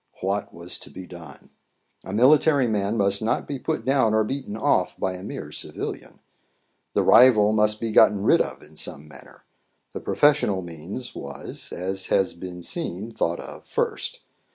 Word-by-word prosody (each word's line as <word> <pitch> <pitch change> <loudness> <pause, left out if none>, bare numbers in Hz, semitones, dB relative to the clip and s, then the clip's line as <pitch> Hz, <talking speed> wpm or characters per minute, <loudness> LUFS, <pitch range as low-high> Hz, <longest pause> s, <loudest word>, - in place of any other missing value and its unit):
What 100 +2 -2
was 85 +1 -5
to - - -13
be 95 - -9
done? 85 -3 -12 0.5
A - - -8
military 140 +5 +4
man 105 -1 0
must 100 0 +3
not 110 - -1
be 140 -2 -4
put 155 -5 -3
down 130 -5 +3
or 110 - +4
beaten 120 -2 -4
off 95 -4 +1
by 95 - -1
a 90 - -8
mere 100 - -7
civilian. - - -6 0.8
The - - +2
rival 110 -4 +6
must 105 0 +2
be 115 -1 -2
gotten 105 -1 +5
rid - - +5
of - - -4
in 75 0 -17
some 75 0 -4
manner; 70 -3 -16 0.5
the - - -4
professional 145 -11 +2
means 85 +9 -7
was, 70 0 -8
as 95 +1 -3
has 95 - +2
been 90 0 -8
seen 110 - -4
thought 85 -6 -1
of - - -10
first. - - -2
105 Hz, 170 wpm, -24 LUFS, 90-115 Hz, 0.8 s, rival